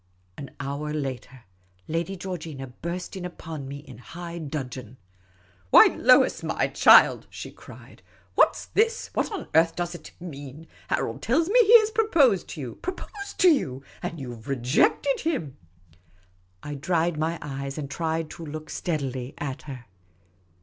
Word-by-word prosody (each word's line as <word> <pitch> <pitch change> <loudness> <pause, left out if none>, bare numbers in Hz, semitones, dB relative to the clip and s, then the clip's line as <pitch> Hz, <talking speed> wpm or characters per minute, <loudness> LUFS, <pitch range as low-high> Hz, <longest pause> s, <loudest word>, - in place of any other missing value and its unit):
An 140 - -8
hour 140 +2 -4
later, 135 -4 -5 0.4
Lady 170 +4 -2
Georgina 165 -7 -6
burst 170 +9 -6
in 185 - -6
upon 160 -5 -7
me 140 +1 -6
in 135 -5 -12
high 170 +5 -8
dudgeon. 130 -5 -6 0.3
" 90 -1 -33
Why, - - +8
Lois, - - +5
my - - -1
child! - - +6
" - - -33
she - - -8
cried. - - -14 0.2
" 90 -1 -33
What - - +5
's - - -7
this? 455 +2 +1
What - - -1
on 395 -7 -5
earth 165 +1 +4
does 175 0 -3
it 175 - -10
mean? 145 -3 -9 0.2
Harold 115 - -2
tells 320 +9 +1
me 485 +5 +5
he 460 +3 +9
has 435 0 -2
proposed 330 - +3
to 155 - -7
you 125 -3 -6
— - - -29
proposed 400 +3 -7
to 365 - +8
you 135 - 0
— - - -24
and 165 - -5
you 125 -3 -6
've 115 +1 -13
rejected 135 - +2
him! 265 - -2 0.5
" 90 +1 -36
I 145 - -5
dried 165 +3 0
my 165 +2 0
eyes 140 -1 -5
and 150 -2 -4
tried 160 +2 -2
to 170 - -9
look 155 0 -7
steadily 135 -6 -3
at 135 -3 -4
her. 125 -3 -8
150 Hz, 175 wpm, -26 LUFS, 130-175 Hz, 0.5 s, he